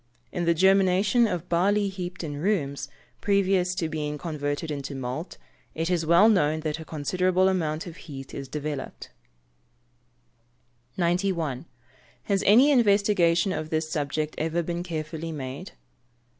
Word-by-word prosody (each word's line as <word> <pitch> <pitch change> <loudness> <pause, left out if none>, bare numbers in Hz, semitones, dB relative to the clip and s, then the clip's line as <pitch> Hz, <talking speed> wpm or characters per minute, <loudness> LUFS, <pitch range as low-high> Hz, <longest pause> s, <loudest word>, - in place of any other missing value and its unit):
In 175 - -2
the 170 0 +3
germination 195 +5 +4
of 180 -4 -3
barley 200 +4 +2
heaped 180 -2 -6
in 145 -3 -4
rooms, 145 -6 -1 0.3
previous 190 -2 +2
to 170 -3 -1
being 150 -1 -3
converted 150 0 -3
into 140 -1 -5
malt, 130 +6 -5 0.4
it 165 +2 -1
is 165 -3 0
well 170 +6 +6
known 155 -7 +2
that 155 0 -3
a 160 - -8
considerable 180 +5 +1
amount 160 -4 -1
of 170 -2 -9
heat 135 -4 -9
is 140 -1 -6
developed. 150 -1 -5 1.9
91. 170 -5 0 0.6
_Has 195 -1 +1
any 250 +9 +7
investigation 200 -7 +3
of 155 0 -4
this 155 0 -1
subject 150 +1 -2
ever 165 +2 0
been 175 +1 -3
carefully 160 -1 -5
made? 140 +4 -6
170 Hz, 135 wpm, -26 LUFS, 150-185 Hz, 1.9 s, any